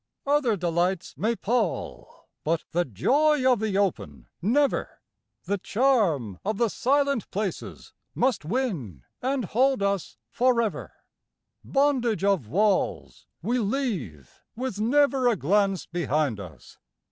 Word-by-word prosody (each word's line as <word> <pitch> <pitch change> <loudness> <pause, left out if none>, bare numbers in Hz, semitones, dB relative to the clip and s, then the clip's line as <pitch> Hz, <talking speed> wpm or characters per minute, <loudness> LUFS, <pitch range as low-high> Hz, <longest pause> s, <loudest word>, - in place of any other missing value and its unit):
Other 280 -6 +2
delights 175 +1 -1
may 225 +3 0
pall, 225 -3 -3 0.2
but 165 +1 0
the 175 +1 +1
joy 275 - +2
of 250 -4 +4
the 210 -3 -1
open 75 - -2
never; 275 - +1 0.4
The 200 0 -2
charm 190 - +1
of 215 +1 -2
the 235 0 +2
silent 280 0 +1
places 200 -2 -5 0.2
must 250 -7 +1
win 155 - -3 0.2
and 260 -2 -1
hold 255 +3 +2
us 200 -2 -1
forever; 235 -3 +1 0.7
Bondage 260 -7 +1
of 195 - +1
walls 200 - 0 0.2
we 245 +2 0
leave 200 - -3
with 250 -3 -4
never 270 +2 +3
a 240 - +3
glance 195 +3 +1
be 175 0 -4
hind 145 -7 0
us. 80 -10 -12
210 Hz, 125 wpm, -26 LUFS, 175-255 Hz, 0.7 s, of